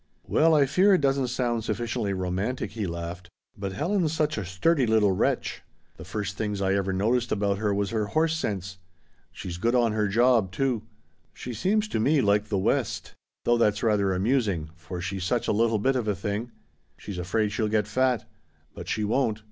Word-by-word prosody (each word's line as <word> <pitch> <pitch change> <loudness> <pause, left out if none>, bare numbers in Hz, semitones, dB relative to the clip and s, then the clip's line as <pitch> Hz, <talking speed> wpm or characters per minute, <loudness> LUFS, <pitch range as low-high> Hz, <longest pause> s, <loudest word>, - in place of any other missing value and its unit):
"Well 160 0 +4
I 145 -2 +5
fear 190 +8 +4
it 180 - 0
doesn't 135 -2 +2
sound 120 -2 -1
sufficiently 115 0 -2
romantic," 95 +6 -2
he 105 -2 -3
laughed, 85 +1 -6 0.3
"but 100 -2 -5
Helen's 170 - 0
such 155 -1 0
a 105 - -3
sturdy 125 - +1
little 110 -3 +4
wretch. 95 - 0 0.4
The 80 - -9
first 100 +2 -4
things 105 -2 -2
I 95 0 +1
ever 100 -1 0
noticed 115 +5 +1
about 100 -1 0
her 105 -1 0
was 100 0 -1
her 110 -2 -1
horse 160 +6 +1
sense. 95 - -4 0.5
She's 85 -2 -7
good 120 +5 +1
on 120 -2 +3
her 105 -1 +1
job, 115 -2 +3
too. 125 +2 0 0.5
She 125 - -6
seems 205 - +1
to - - -1
me 145 +7 +3
like 105 -3 +2
the 105 -2 -1
West. 95 - -1 0.3
Though 120 0 +3
that's 105 -1 +2
rather 105 -4 +2
amusing, 95 - 0
for 90 +1 -7
she's 90 +1 -3
such 120 +5 0
a - - +2
little 115 +1 +2
bit 130 +6 +1
of 120 -4 -1
a 105 - +1
thing. 105 +5 -3 0.5
She's 100 -3 -7
afraid 105 +4 0
she'll 110 +1 0
get 105 -1 +1
fat. 125 +3 0 0.5
But - - -9
she 110 - -1
won't. 110 0 +1
110 Hz, 195 wpm, -26 LUFS, 100-125 Hz, 0.5 s, I